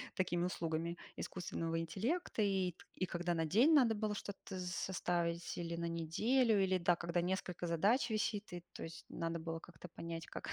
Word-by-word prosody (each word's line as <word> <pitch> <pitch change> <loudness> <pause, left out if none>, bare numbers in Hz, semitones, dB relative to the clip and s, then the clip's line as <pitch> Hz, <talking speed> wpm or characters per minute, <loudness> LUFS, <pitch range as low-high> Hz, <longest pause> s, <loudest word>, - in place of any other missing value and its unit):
такими 175 -1 +1
услугами 170 -1 -1 0.2
искусственного 165 -2 -2
интеллекта. 215 - -1
И 190 -3 +2 0.2
и 185 - 0
когда 175 0 -1
на 165 - +1
день 235 - +5
надо 245 -6 +6
было 210 0 -1
что-то 200 -1 -6
з 180 - -3
составить, 175 -2 -1
или 170 -1 -2
на 170 0 -1
неделю, 210 +8 +3
или, 190 0 +3
да, 175 0 +4
когда 170 0 0
несколько 180 -1 -2
задач 200 - +3
висит, 215 -1 -1
и 175 - -5
то - - -6
есть 165 0 -8
надо 165 0 -2
было 165 0 -3
как-то 175 +1 -11
понять, 165 -1 -5
как 315 - -6
175 Hz, 175 wpm, -37 LUFS, 170-205 Hz, 0.2 s, надо